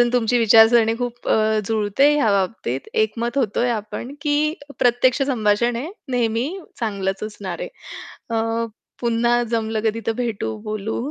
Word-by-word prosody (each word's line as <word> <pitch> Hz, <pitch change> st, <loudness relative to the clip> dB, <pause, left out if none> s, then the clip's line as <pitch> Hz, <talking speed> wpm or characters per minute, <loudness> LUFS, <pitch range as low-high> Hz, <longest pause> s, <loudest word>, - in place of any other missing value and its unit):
आणि 240 Hz, 0 st, +4 dB
तुमची 245 Hz, 0 st, +2 dB
विचारसरणी 225 Hz, 0 st, +6 dB
खूप 245 Hz, -1 st, -4 dB
अ, -, -, +4 dB, 0.3 s
जुळते 220 Hz, +5 st, +2 dB
ह्या 235 Hz, -8 st, +2 dB
बाबतीत, 185 Hz, -, -2 dB, 0.2 s
एकमत 235 Hz, +4 st, -3 dB
होतोय 240 Hz, 0 st, +1 dB
आपण 230 Hz, +4 st, -4 dB
की 290 Hz, -1 st, +1 dB, 0.4 s
प्रत्यक्ष 245 Hz, +2 st, +3 dB
संभाषण 235 Hz, -3 st, +1 dB
हे 285 Hz, +9 st, -4 dB, 0.2 s
नेहमी 235 Hz, +2 st, +1 dB, 0.3 s
चांगलंच 195 Hz, -3 st, -2 dB
असणार 200 Hz, -4 st, -6 dB
आहे. -, -, -4 dB, 0.7 s
अ, 225 Hz, +1 st, 0 dB, 0.3 s
पुन्हा 235 Hz, 0 st, +2 dB
जमलं 225 Hz, -1 st, -1 dB
कधी 220 Hz, +1 st, 0 dB
तर 225 Hz, -, +2 dB
भेटू, 200 Hz, -, -3 dB
बोलू 215 Hz, 0 st, -3 dB
230 Hz, 140 wpm, -21 LUFS, 215-240 Hz, 0.7 s, विचारसरणी